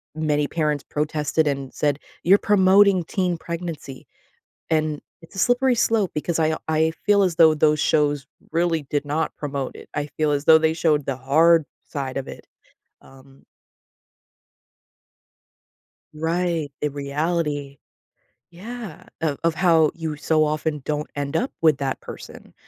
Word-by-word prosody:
many 150 -2 0
parents 150 -3 -1
protested 150 +1 0
and 135 -2 -3
said, 145 -1 0 0.2
"You're 190 +4 +6
promoting 195 -2 +4
teen 180 -1 -1
pregnancy." 165 -5 -7 0.6
And 155 -2 0 0.2
it's 165 - -16
a - - -4
slippery 245 +3 +3
slope 220 -4 +1
because 160 +2 -1
I 160 0 +2
I 160 0 +2
feel 205 -1 +4
as 180 -3 0
though 160 -2 +7
those 150 0 +3
shows 145 -3 +1 0.2
really 165 -1 +1
did 145 0 -1
not 150 +2 -2
promote 140 -3 -4
it. - - -12
I 145 0 -2
feel 155 -1 +1
as 145 0 -1
though 160 - +8
they 160 0 +2
showed 155 -3 +1
the 135 -2 -2
hard 160 +5 +4 0.2
side 135 -2 -5
of 135 - -4
it. - - -10 0.6
Um 135 0 -19 2.7
Right. 165 -1 -1
The 150 - 0
reality 145 0 -2 0.7
yeah, 210 0 -9 0.2
of 150 -3 -1
of 165 - +3
how 165 -3 +4
you 160 -2 -4
so 155 +1 +2
often 155 0 -1
don't 150 +1 -3
end 140 -1 -2
up 255 - -1
with 155 -4 +4
that 135 -1 -3
person, - - -11
155 Hz, 145 wpm, -23 LUFS, 145-170 Hz, 2.7 s, though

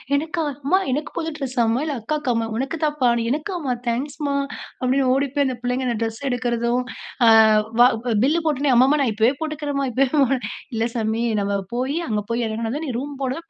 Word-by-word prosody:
"எனக்கா? 320 +3 -1 0.2
அம்மா 365 +7 +4
எனக்கு 295 +4 -2
புது 325 -1 -2
டிரெஸ்ஸாமா? 245 -4 0
இல்ல 295 -3 -2
அக்காக்கா 290 +2 -1
அம்மா?", 225 0 0
"உனக்கு 275 +5 -2
தான்ப்பா." 295 -5 +2 0.2
"எனக்கா 305 +7 -2
அம்மா? 265 -5 -1 0.2
தேங்க்ஸ்மா" 280 +4 -2 0.5
அப்டீன்னு 260 +1 +2
ஓடி 275 +2 +1
போய் 285 -1 +3
அந்த 255 -2 -3
பிள்ளைங்க 250 +1 -1
அந்த 235 -2 -1
ட்ரெஸ் 225 +3 -4
எடுக்கிறதும். 245 0 0 0.4
அ - - +9 0.5
வா 245 - +9 0.4
பில் 320 +4 +2
போட்டொன்னே, 285 -2 +2
"அம்மா! 255 +2 +6
அம்மா! 300 +1 +3
நான் 235 -5 0
இப்போவே 225 +5 +3
போட்டுக்கிறேன்ம்மா 295 -3 -2
இப்போவே", 270 +1 +2 0.4
"இல்ல 225 0 0
சாமி. 225 +1 0 0.2
நம்ம 200 0 0 0.2
போய் 265 +6 -1
அங்க 210 -1 0
போய் 235 0 0
எறங்குனதும் 230 +8 -3
நீ - - -2
ரூம் 285 +2 -5
போனதும் 325 +6 -4
260 Hz, 180 wpm, -22 LUFS, 235-295 Hz, 0.5 s, அ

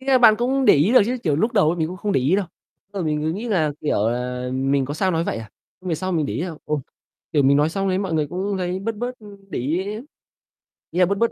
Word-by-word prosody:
Thế 265 - -14
nà 265 -1 +5
bạn 235 -3 +7
cũng 260 +2 +1
để - - +7
ý 155 - +3
được 255 - +8
chứ, 250 +1 -1
kiểu, 150 -5 +1
lúc 220 +10 +1
đầu 155 - +4
ấy 170 - 0
mình 160 - 0
cũng 185 - -6
không 205 +1 -2
để - - +2
ý 145 +9 +2
đâu, 200 -3 -1 0.4
ờ, 200 -2 -3
mình 150 -2 -1
cứ 160 - 0
nghĩ 220 +7 -5
là, 160 -8 +1
kiểu 110 -7 +1
là, 125 +1 -3
mình 135 +1 +1
có 145 +3 -4
sao 185 +3 +1
nói 165 0 0
vậy - - -2
à, 110 -1 -9 0.3
nhưng 185 - -7
về 165 - +1
sau 185 +3 -3
mình 155 -4 +1
để - - -4
ý - - -2
là, 175 -3 -4
ồ, 150 -2 -1 0.5
kiểu, 145 -3 +3
mình 140 +1 +5
nói 150 +1 +3
xong 195 +2 -1
đấy 185 - +1
mọi 190 -3 -2
người 155 -2 +1
cũng 190 +4 -3
thấy 180 0 -2
bớt 225 +3 -3
bớt 245 +3 -3 0.4
để - - -3
ý, 155 +9 -1 1.1
ý 175 - -2
là 180 - +6
bớt 200 +3 -1
bớt 230 +2 +2
175 Hz, 295 wpm, -22 LUFS, 150-200 Hz, 1.1 s, được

